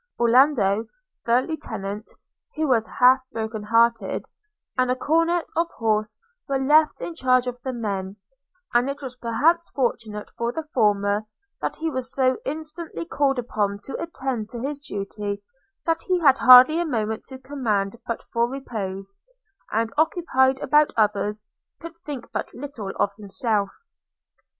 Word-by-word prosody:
Orlando, 235 -4 +4 0.4
the 240 +2 +3
lieutenant 215 -9 -5 0.5
(who 310 0 0
was 230 -5 +2
half 255 +1 +5
broken 220 -1 -4
hearted), 230 +2 +2 0.5
and 255 -1 +1
a 250 - +2
cornet 330 +5 +1
of 335 +1 +1
horse 215 -1 0 0.3
were 275 - +1
left 300 +4 +4
in 345 - -5
charge 255 -5 +2
of 245 0 -5
the 260 - -3
men; 200 -5 -3 0.6
and 240 +3 +3
it 280 +1 -5
was 255 -2 -6
perhaps 290 +9 +1
fortunate 220 -5 -2
for 235 0 -2
the 320 +3 -5
former, 205 -2 +2 0.3
that - - -2
he 320 0 -2
was 260 -1 -4
so 260 -1 +1
incessantly 315 +3 -5
called 280 -5 +1
upon 210 -4 -1
to 275 - -6
attend 265 -9 -4
to 240 - -6
his 280 +2 -3
duty 205 -5 -5 0.4
that 330 -1 +1
he 370 -1 +1
had 275 -5 +5
hardly 255 +6 +9
a - - +2
moment 220 -6 -2
to 265 - -9
command 235 -7 -2
but 230 - -3
for 235 0 +2
repose, 200 -7 -5 0.6
and, 225 +1 0
occupied 310 -6 +2
about 300 0 +4
others, 210 0 +1 0.3
could 335 0 -9
think 295 -7 -7
but - - -3
little 245 -7 -6
of 200 - +2
himself. 205 0 -1
250 Hz, 150 wpm, -24 LUFS, 215-285 Hz, 0.6 s, hardly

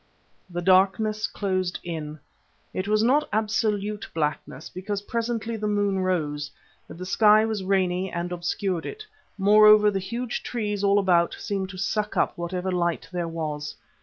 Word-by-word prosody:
The 175 0 -4
darkness 195 +4 +3
closed 185 -3 -2
in. 155 -3 -5 0.5
It 185 +1 -3
was 215 +1 +2
not 285 +6 +3
absolute 210 -1 -1
blackness, 150 -2 -3
because 200 +2 -5
presently 230 0 -2
the 210 0 -2
moon 205 -2 +1
rose, 150 -6 -1 0.4
but - - -11
the 185 - -6
sky 215 +3 +5
was 220 -3 -2
rainy 185 -1 0
and 170 +1 -3
obscured 175 0 -2
it; 430 0 -8 0.3
moreover, 210 +1 +6
the 195 - -1
huge 235 +5 -4
trees 210 -4 -3
all 200 0 +4
about 175 -4 +3
seemed 195 -2 -3
to 190 - -9
suck 210 +3 -2
up - - +1
whatever 180 +2 -3
light 175 -2 -1
there 175 -2 -2
was. 150 -3 -4
195 Hz, 155 wpm, -25 LUFS, 175-210 Hz, 0.5 s, moreover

